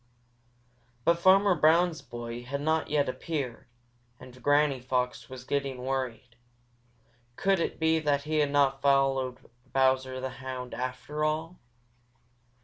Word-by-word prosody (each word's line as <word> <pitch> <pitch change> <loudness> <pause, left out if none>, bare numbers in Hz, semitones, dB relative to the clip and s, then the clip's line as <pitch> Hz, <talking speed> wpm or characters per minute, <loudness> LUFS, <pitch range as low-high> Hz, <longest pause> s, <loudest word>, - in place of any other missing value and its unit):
But 170 0 +3
Farmer 195 +2 +5
Brown's 165 0 +3
boy 120 -2 -7
had 135 +3 -4
not 160 +2 0
yet 145 -1 +1
appeared, 130 -3 -4 0.5
and 125 0 -13
Granny 145 0 +3
Fox 125 0 -2
was 130 -1 -9
getting 140 -1 -2
worried. 130 -2 -4 1.0
Could 195 +4 +2
it - - -2
be 160 0 +3
that 145 -2 0
he 155 +1 0
had 145 -1 +2
not 140 -1 +2
followed 135 -2 +2 0.3
Bowser 130 -1 +2
the 130 0 -4
Hound, 130 -1 -6
after 130 +4 -4
all? 160 +3 -2
140 Hz, 130 wpm, -28 LUFS, 130-155 Hz, 1.0 s, Farmer